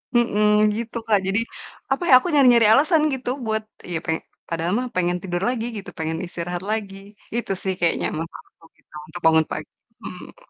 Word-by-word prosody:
mhm, 210 -2 +4
gitu, 230 +1 -4
Kak. 210 -2 +4
Jadi, 200 +3 +2 0.5
apa, 275 +6 +1
ya, - - +7
aku 305 - -5
nyari-nyari 245 -6 +6
alasan 310 +5 +4
gitu 250 -2 -3 0.2
buat, 220 0 -1 0.3
ya, 165 - 0
peng 160 -2 0 0.3
padahal 165 +2 -1
mah 255 - -2
pengen 180 0 +1
tidur 175 -2 -2
lagi 235 -2 -2
gitu, 195 - -7
pengen 160 0 -2
istirahat 175 0 -4
lagi. 205 -3 -3 0.4
Itu, 235 - -2
sih, 190 - 0
kayaknya 170 -1 +1
masalahku 165 0 -10
gitu - - -31
untuk 175 +3 -9
bangun 160 -1 +5
pagi, - - -5 0.3
mhm. - - -11
205 Hz, 175 wpm, -23 LUFS, 175-240 Hz, 0.5 s, ya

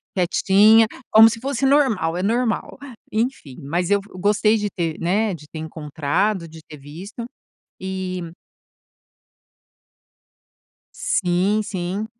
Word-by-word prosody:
quietinha 200 +4 +4 0.2
como 220 +1 +8
se 230 0 -6
fosse 275 0 -1
normal. 255 - +2
É 180 - -2
normal", 230 +2 -1 0.3
enfim. 220 - -3
Mas 170 +6 -2
eu 205 - +4
f 200 - -18
gostei 210 +3 +2
de 210 -1 -2
ter, 165 -4 -3
né, 200 +5 0
de 155 -3 -10
ter 160 - -7
encontrado, 160 +4 -2
de 160 0 -13
ter 150 - -12
visto. 170 - -9 0.6
E 185 -2 -5 2.6
Sim, 195 - 0
sim. 195 0 -4
190 Hz, 120 wpm, -21 LUFS, 170-220 Hz, 2.6 s, como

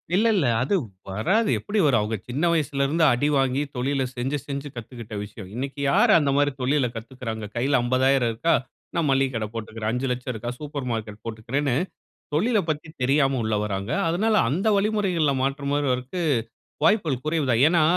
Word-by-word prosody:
இல்ல 215 +4 +4
இல்ல 180 -8 +2 0.2
அது 135 +10 +1 0.3
வராது 190 - +1
எப்படி 210 +1 -2
வரும்? 130 -6 +4
அவங்க 105 +2 -1
சின்ன 135 +6 -2
வயசுல 145 -4 +1
இருந்து 160 +4 +1
அடி 125 +5 +1
வாங்கி 135 0 +2
தொழில 135 +2 0
செஞ்சு, 130 +4 -1
செஞ்சு 140 0 -4
கத்துக்கிட்ட 120 -2 -8
விஷயம். 105 -2 -10
இன்னைக்கு 135 +3 -4
யாரு - - +5
அந்த 145 -3 +1
மாரி 145 0 +3
தொழில 135 0 +2
கத்துக்கிறாங்க? 115 -2 -6
கையில 135 +3 +2
ரூ.50,000 130 0 +3
இருக்கா 165 +10 +1 0.4
நான் 165 -3 +1
மல்லிக 135 0 +2
கட 110 -1 -1
போட்டுக்குறேன். 110 -1 -4
ரூ.5,00,000 125 0 -2
இருக்கா 120 +2 -4
சூப்பர் 145 -3 -5
மார்க்கெட் 110 -2 -4
போட்டுக்குறேன்னு 120 +5 -1 0.6
தொழில 220 +9 +2
பத்தி 155 0 -2
தெரியாம 135 0 +3
உள்ள 110 0 0
வராங்க. 100 +1 -3 0.2
அதனால 210 +7 +1
அந்த 170 - -1
வழிமுறைகள்ல 195 -7 +1
மாற்ற 140 +1 -1
மாறுவதற்கு 135 +2 -1 0.6
வாய்ப்புகள் 160 - +2
குறைவு 155 -1 0
தான். 115 -1 +3
ஏன்னா, 165 0 +4
135 Hz, 165 wpm, -24 LUFS, 120-150 Hz, 0.6 s, யாரு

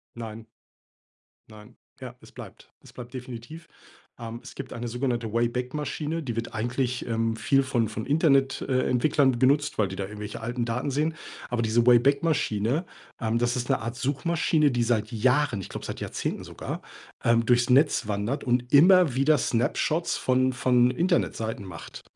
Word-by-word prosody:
Nein. 115 -1 -8 1.0
Nein. 105 -1 -15 0.2
Ja, - - -8
es - - -17
bleibt. - - -12
Es - - -16
bleibt 120 +1 -10
definitiv. 125 +5 -9 0.5
Ähm, 115 0 -7
es - - -11
gibt 135 -2 -8
eine 120 0 -5
sogenannte 120 -2 -2
Wayback-Maschine, 130 +7 -2
die 120 -5 -4
wird 115 - -4
eigentlich, 120 +2 -2
ähm, 115 -1 -1
viel 135 +2 +2
von 120 -4 0
von 110 0 -6
Internet 140 -3 +2
äh, 130 -1 0
Entwicklern 130 0 +2
genutzt, 140 +3 +2
weil 105 -3 +2
die 95 - -7
da 100 - -3
irgendwelche 105 +2 -7
alten 120 +1 -3
Daten 125 +4 -2
sehen, 150 +4 0 0.4
aber 120 -1 0
diese 115 +2 +2
Wayback-Maschine, 135 - +2 0.4
ähm, 115 0 0
das 120 +1 0
ist 125 -1 -3
'ne - - +2
Art 115 +2 -5
Suchmaschine, 150 +3 +1
die 120 -1 0
seit 110 -2 0
Jahren, 125 0 +1
ich - - -8
glaube - - -7
seit - - -6
Jahrzehnten - - -4
sogar, - - -7 0.4
ähm, 115 0 +3
durchs 120 +1 +2
Netz 140 -3 +4
wandert 105 +7 -2
und 125 -1 0
immer 175 -1 +6
wieder 140 +4 +3
Snapshots 125 +8 0
von 130 0 +1
von 125 0 +3
Internetseiten 130 - -1
macht. 90 -4 -10
125 Hz, 165 wpm, -26 LUFS, 115-140 Hz, 1.0 s, immer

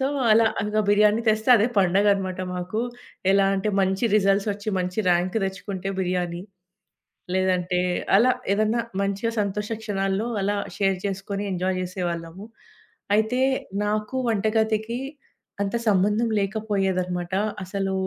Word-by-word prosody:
So, 265 - +1 0.3
అలా 225 +1 +5 0.2
అలాగా 210 +1 0
బిర్యానీ 210 +2 +4
తెస్తే 220 +3 +1
అదే 220 +3 +2
పండగన్నమాట 190 0 +2 0.2
మాకు. 185 +6 -2 0.5
ఎలా 195 0 +4
అంటే, 210 +2 -1
మంచి 190 +4 0
రిజల్ట్సొచ్చి 200 +1 +1
మంచి 180 +3 -4
ర్యాంక్ 180 +4 +1
తెచ్చుకుంటే 190 0 -5
బిర్యానీ. 180 -1 -2 0.9
లేదంటే 185 -1 +1 0.4
అలా 235 +6 +5 0.2
ఏదన్నా 215 +3 +2 0.2
మంచి 200 +2 -1
సంతోష 210 0 -1
క్షణాల్లో 195 0 -1 0.2
అలా 205 +1 0 0.2
షేర్ 195 -1 +1
చేసుకొని, 195 +1 -3
ఎంజాయ్ 185 +1 -1
చేసేవాళ్లము. 175 0 -4 0.7
అయితే, 220 +4 +1 0.5
నాకు 215 +3 -2
వంటగదికి 220 +2 0 0.6
అంత 200 +3 -1
సంబంధం 210 +4 +2
లేకపోయేదన్నమాట. 190 -4 -1 0.3
అసలు 195 +1 -2
200 Hz, 115 wpm, -24 LUFS, 185-215 Hz, 0.9 s, అలా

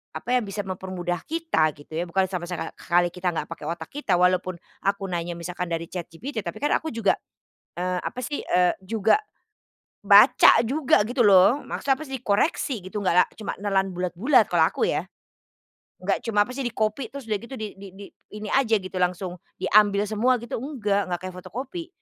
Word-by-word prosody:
apa - - -5
yang 250 -4 +2
bisa 205 +1 -4
mempermudah 185 -2 -4
kita, 310 - +1
gitu 145 +2 -17
ya, 165 +3 -2
bukan 190 +3 +1
sampai 180 -2 -4
seka 180 -1 -4
khali 175 0 +2
kita 180 -1 -2
nggak - - -3
pakai 150 - -7
otak 165 -1 -5
kita, 275 -10 0
walaupun 180 +1 +2 0.3
aku 195 -1 -1
nanya 175 0 -3
misalkan 175 +1 -5
dari 165 0 -3
ChatGPT 185 - -6
tapi 175 -5 -5
kan 295 - +2
aku 320 - +1
juga, 225 -3 +1 0.6
eee, 180 0 -1
apa - - -6
sih, 290 +3 -3
eee, 180 -1 +2
juga 220 - +2 0.8
baca - - +7
juga 265 -2 +3
gitu 245 -2 +2
loh, 200 +7 +5
maksudnya 270 -1 0
apa 310 - -7
sih, 265 -3 -6
koreksi 245 +3 0
gitu 205 +2 -4
nggak 185 -3 +1
la 180 - +7
cuma 215 - -5
nelan 195 -1 0
bulat-bulat 180 - +3
kalau - - +4
aku - - -1
ya. - - 0 1.0
Nggak - - -1
cuma 210 -2 +3
apa - - -8
sih - - -6
di 240 - -2
copy 215 +4 -1
terus 280 -1 -7
udah 210 -2 -1
gitu 235 +5 -9
di 215 -2 -4
di 200 - -9
di 200 +1 -9 0.3
ini 210 0 -6
aja 250 -5 +3
gitu 185 0 -9
langsung 180 0 -1 0.2
diambil 205 -1 +4
semua 225 +5 +2
gitu 235 - -4
nggak, 215 -7 -1
nggak 175 - -1
kayak 185 - -8
fotokopi. 260 - -6
200 Hz, 195 wpm, -25 LUFS, 180-235 Hz, 1.0 s, baca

